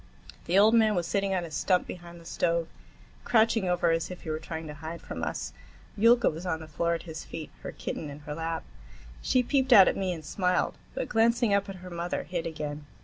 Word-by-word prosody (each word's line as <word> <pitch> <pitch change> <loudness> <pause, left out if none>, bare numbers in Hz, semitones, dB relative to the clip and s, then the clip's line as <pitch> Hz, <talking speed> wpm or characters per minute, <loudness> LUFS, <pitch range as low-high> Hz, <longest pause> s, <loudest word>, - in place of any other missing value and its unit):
The 180 - +2
old 215 +3 +7
man 220 -2 +4
was 175 -2 0
sitting 195 0 0
on 180 - 0
a 165 - -9
stump 180 +4 +1
behind 175 -1 -9
the 165 - -15
stove, 170 0 0 0.6
crouching 225 -4 +3
over 175 -1 +2
as 165 0 0
if 180 - -9
he 160 - -4
were 155 - -2
trying 160 0 -6
to 150 - -7
hide 160 +3 -7
from - - -7
us. - - -3 0.4
Yulka 235 +3 +5
was 160 +3 -1
on 170 -3 -1
the 160 - -9
floor 170 +2 0
at 165 - -6
his 160 -2 -7
feet, 160 -2 -7
her - - -5
kitten 155 - -5
in 145 +1 -9
her 150 0 -6
lap. 165 +1 -3 0.6
She 255 - +2
peeped 265 +1 +1
out 195 -6 +10
at - - +2
me 190 -2 -1
and 160 -3 -6
smiled, 180 +3 +1 0.2
but, - - -2
glancing 230 -1 +3
up 200 0 +1
at 195 - -5
her 180 - -8
mother, 170 +1 -3
hid 175 -2 -3
again. 150 -2 -5
175 Hz, 230 wpm, -28 LUFS, 160-200 Hz, 0.6 s, out